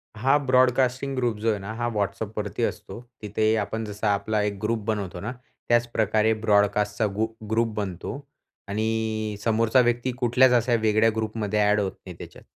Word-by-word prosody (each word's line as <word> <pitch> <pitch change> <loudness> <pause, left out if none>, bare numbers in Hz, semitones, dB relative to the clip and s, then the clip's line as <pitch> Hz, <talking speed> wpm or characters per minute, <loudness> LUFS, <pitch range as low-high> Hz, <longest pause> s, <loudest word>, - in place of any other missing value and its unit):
हा 135 +6 +3
broadcasting 130 0 +2
group 120 -4 0
जो 115 +2 0
आहे 105 -2 0
ना, 100 +3 -6
हा 120 +1 -2
WhatsAppवरती 105 +2 -3
असतो. 105 -2 -4 0.2
तिथे 110 +1 +1
आपण 110 +2 -4
जसा 105 0 -1
आपला 105 +2 -1
एक 105 -1 -2
ग्रुप 110 +1 0
बनवतो 100 -5 -3
ना, 110 +7 -4 0.4
त्याच 120 0 +3
प्रकारे 110 0 +2
ब्रॉडकास्टचा 105 0 +2
गु 110 +2 +1 0.2
ग्रुप 115 0 +1
बनतो 95 -5 -4 0.6
आणि 110 0 -1
समोरचा 115 +3 +3
व्यक्ती 120 +1 0
कुठल्याच 125 +1 +4
अशा 120 0 +2
वेगळ्या 110 +1 +3
ग्रुपमध्ये 110 -1 -2
ॲड 105 +1 +3
होत 100 -2 -1
नाही - - -8
त्याच्यात. - - -11
110 Hz, 160 wpm, -25 LUFS, 105-120 Hz, 0.6 s, कुठल्याच